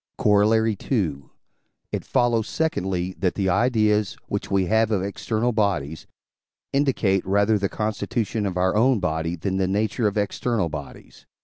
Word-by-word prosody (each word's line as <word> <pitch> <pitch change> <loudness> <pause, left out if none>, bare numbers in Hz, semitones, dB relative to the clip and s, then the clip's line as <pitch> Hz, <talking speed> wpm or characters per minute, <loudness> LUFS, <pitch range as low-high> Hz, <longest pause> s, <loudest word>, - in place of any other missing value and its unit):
Corollary 110 +2 +3 0.2
II. 80 - 0 0.7
It - - -3
follows, 115 -2 +1
secondly, 95 - -1
that 90 0 0
the 95 -2 0
ideas, 105 -1 +2
which - - -4
we 95 -1 +2
have 110 +3 +2
of 100 -4 0
external 110 +4 -1
bodies, 95 - -1 0.7
indicate 120 -9 +1
rather 100 +2 +2
the 100 -1 -1
constitution 105 0 -2
of 90 -2 -3
our 95 +1 +1
own 120 +2 +3
body 80 -1 -1
than 95 +3 -2
the 95 -1 +1
nature 105 +4 0
of 105 - -2
external 105 -1 -1
bodies. 75 -4 -10
100 Hz, 145 wpm, -23 LUFS, 95-110 Hz, 0.7 s, Corollary